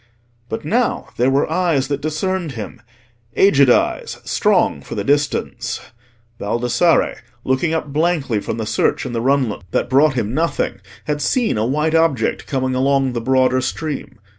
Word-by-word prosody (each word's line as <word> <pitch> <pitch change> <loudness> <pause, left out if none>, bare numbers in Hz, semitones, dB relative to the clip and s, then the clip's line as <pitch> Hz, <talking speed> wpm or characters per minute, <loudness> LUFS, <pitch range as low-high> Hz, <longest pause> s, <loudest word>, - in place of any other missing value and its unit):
But 110 - -5
now 235 +9 0
there 125 +2 +3
were 135 +1 +2
eyes 160 -5 +1
that 140 0 -2
discerned 160 +1 -2
him—aged 120 - 0
eyes, - - +1
strong - - +1
for - - -8
the - - -2
distance. 145 +1 -1 0.6
Baldassarre, 120 +10 +1 0.3
looking 145 +6 0
up 150 -3 -4
blankly 150 -8 +1
from 110 - -4
the 110 - -3
search 125 - 0
in 125 - -5
the 115 - -1
runlet 130 -4 +1
that 120 - -1
brought 135 +1 +4
him 115 -2 -1
nothing, 155 -9 -1 0.2
had 150 -1 -2
seen 240 - +1
a 110 +1 0
white 150 +4 0
object 160 -8 +1
coming 130 -2 -1
along 135 0 +1
the 120 - -2
broader 130 +1 +2
stream. 150 0 -4
135 Hz, 155 wpm, -19 LUFS, 120-155 Hz, 0.6 s, brought